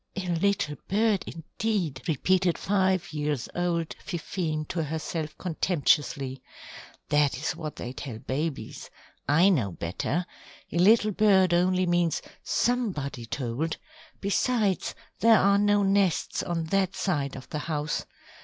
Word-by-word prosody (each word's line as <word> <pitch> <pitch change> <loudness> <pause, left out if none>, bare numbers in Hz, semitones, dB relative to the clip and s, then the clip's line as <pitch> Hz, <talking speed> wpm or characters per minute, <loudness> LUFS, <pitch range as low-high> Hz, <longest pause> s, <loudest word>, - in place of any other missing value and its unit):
"A 185 -2 -3
little 170 -4 +1
bird 210 0 +2
indeed," 165 - -3
repeated 180 +4 +2
five 190 -4 +1
years 150 -4 -2
old 170 -2 -1
Fifine 165 -3 -3
to 170 - -1
herself 155 0 -4
contemptuously. 150 -6 0 0.7
"That 150 -3 +3
is 155 +4 -2
what 155 -3 -6
they 125 - -6
tell 130 -3 -6
babies. 135 0 -4 0.4
I 165 +7 +6
know 120 - +1
better. 110 - -2 0.5
A 170 - 0
little 215 +3 +5
bird 190 -3 +4
only 185 +1 +3
means 175 -2 +1 0.2
'somebody' 175 - -1
told. 135 +6 -2 0.4
Besides, 205 0 0 0.2
there 225 0 +6
are 200 +1 +4
no 205 0 +3
nests 195 -3 +1
on 170 -1 -2
that 195 -1 +2
side 145 -8 -1
of 130 - -10
the 150 - -3
house. 150 0 -2
170 Hz, 125 wpm, -27 LUFS, 150-195 Hz, 0.7 s, I